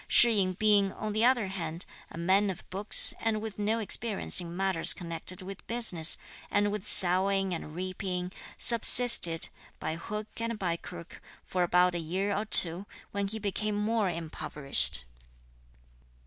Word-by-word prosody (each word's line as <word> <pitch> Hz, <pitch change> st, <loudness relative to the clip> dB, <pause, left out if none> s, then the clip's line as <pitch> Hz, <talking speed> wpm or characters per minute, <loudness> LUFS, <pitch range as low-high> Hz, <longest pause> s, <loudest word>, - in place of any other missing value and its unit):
Shih 235 Hz, -, +4 dB
yin 185 Hz, -2 st, -1 dB
being, 205 Hz, 0 st, 0 dB
on 215 Hz, -1 st, -7 dB
the 215 Hz, +2 st, -2 dB
other 240 Hz, -6 st, 0 dB
hand, 170 Hz, -3 st, -8 dB, 0.2 s
a -, -, -13 dB
man 190 Hz, +4 st, -1 dB
of 185 Hz, -, -9 dB
books 200 Hz, +3 st, +5 dB
and 225 Hz, -1 st, -3 dB
with 215 Hz, -1 st, -10 dB
no 215 Hz, +2 st, -2 dB
experience 215 Hz, -2 st, -1 dB
in 170 Hz, 0 st, -10 dB
matters 190 Hz, -3 st, 0 dB
connected 175 Hz, +1 st, -7 dB
with 195 Hz, +1 st, -12 dB
business 200 Hz, -9 st, +2 dB, 0.3 s
and 205 Hz, 0 st, -2 dB
with 210 Hz, -1 st, -7 dB
sowing 190 Hz, +1 st, +1 dB
and 155 Hz, -2 st, -9 dB
reaping, 185 Hz, 0 st, -7 dB, 0.3 s
subsisted, 235 Hz, -7 st, +6 dB, 0.3 s
by 155 Hz, +1 st, -6 dB
hook 210 Hz, +5 st, -8 dB
and 230 Hz, 0 st, -6 dB
by 180 Hz, -5 st, -4 dB
crook, 170 Hz, 0 st, -13 dB, 0.2 s
for 185 Hz, -, -5 dB
about 180 Hz, +1 st, 0 dB
a 175 Hz, -, -5 dB
year 190 Hz, +5 st, -5 dB
or 210 Hz, -, -5 dB
two, 180 Hz, -1 st, +7 dB, 0.2 s
when 200 Hz, 0 st, -5 dB
he 220 Hz, +3 st, -7 dB
became 210 Hz, 0 st, -5 dB
more 210 Hz, -1 st, -3 dB
impoverished. 150 Hz, -, 0 dB
195 Hz, 155 wpm, -26 LUFS, 175-210 Hz, 0.3 s, two